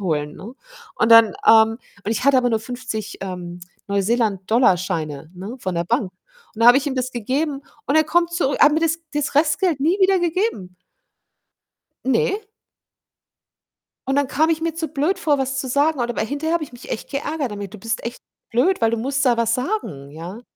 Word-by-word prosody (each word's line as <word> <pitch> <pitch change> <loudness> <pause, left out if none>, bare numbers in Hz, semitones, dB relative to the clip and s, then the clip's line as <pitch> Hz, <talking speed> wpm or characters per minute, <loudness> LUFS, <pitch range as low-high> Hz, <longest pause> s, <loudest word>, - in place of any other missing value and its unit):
holen, 150 -5 -2
ne? 220 +6 -9 0.4
Und 220 - +2
dann, 230 -1 +9 0.2
ähm 225 0 +6 0.3
und 210 - -2
ich 230 - -1
hatte 280 -1 +5
aber 245 -1 +2
nur 225 -1 +1
50, 225 -3 -6
ähm, 180 -2 -6 0.3
Neuseeland 200 -1 0
Dollarscheine, 165 - +1
ne, 195 +7 -7
von 185 -6 -3
der 170 0 -1
Bank. 205 -1 -1 0.4
Und 225 - -9
da - - +6
habe 245 +2 +9
ich 285 - -6
ihm 280 - -1
das 255 -1 -2
gegeben 275 +5 -2 0.2
und 280 - +2
er 315 - +5
kommt 340 +2 +1
zurü 330 -5 0
er - - +7
hat 295 - +4
mir 315 - +1
das 325 0 +1 0.2
das 295 -1 -1
Restgeld 310 +1 +2
nie 335 +8 +2
wieder 380 0 +4
gegeben. 340 - -2 1.3
Ne. 265 - +1 1.7
Und 270 - +1
dann 285 -1 +2
kam 315 +5 +1
ich 320 -1 0
mir 330 -1 -2
zu 325 -1 -3
blöd 310 +7 0
vor, 300 -6 +1
was 270 0 -2
zu 265 - -5
sagen 285 +2 +1
oder 240 0 -2
weil 220 - -1
hinterher 290 +6 -2
habe 335 -2 0
ich 270 - -16
mich 245 - -12
echt 220 - -5
geärgert 290 -1 -3
damit: 200 -1 -7
„Du - - -8
bist 225 +2 -3
echt 235 +1 -6 0.3
blöd, 285 +12 +2
weil 225 -1 +3
du 230 - 0
musst 275 +4 -1
da 245 -3 +3
was 230 0 +1
sagen“, 250 - -3
ja. 170 +9 -9
250 Hz, 205 wpm, -21 LUFS, 215-300 Hz, 1.7 s, dann